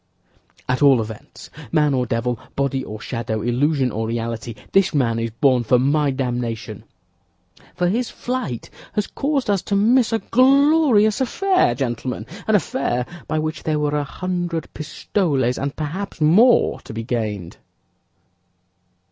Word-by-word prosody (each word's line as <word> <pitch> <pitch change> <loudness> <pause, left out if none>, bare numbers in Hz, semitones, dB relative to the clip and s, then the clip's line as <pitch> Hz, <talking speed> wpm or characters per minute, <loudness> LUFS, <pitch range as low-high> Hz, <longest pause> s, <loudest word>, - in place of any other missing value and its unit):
"At 130 +2 0
all 140 -4 +6
events, 110 -1 -8 0.2
man 150 -2 +3
or 125 -2 0
devil, 115 +1 -1 0.2
body 140 -1 -1
or 110 -2 -7
shadow, 110 -2 -3
illusion 130 +2 +1
or 110 +1 -2
reality, 115 0 -4 0.2
this 190 -4 +3
man 115 -5 +1
is 115 0 -2
born 125 +2 +2
for 125 +3 +3
my 145 +3 +2
damnation; 120 -4 -3 0.9
for 180 - +1
his 230 +6 0
flight 245 - -4 0.2
has 210 - 0
caused 280 -2 -1
us 200 -3 +1
to 200 - -2
miss 235 +4 +3
a 225 - +2
glorious 265 -3 +4
affair, 365 - +2
gentlemen—an 135 - -3
affair 175 - 0 0.2
by - - -1
which 155 -1 -2
there 155 -1 -1
were 150 0 0
a 145 - 0
hundred 175 +1 -4
pistoles, 145 - -1
and 140 0 -3
perhaps 165 +7 -5
more, 195 +11 +4
to - - -10
be 115 - -3
gained." 105 -7 -3
145 Hz, 140 wpm, -21 LUFS, 120-200 Hz, 0.9 s, all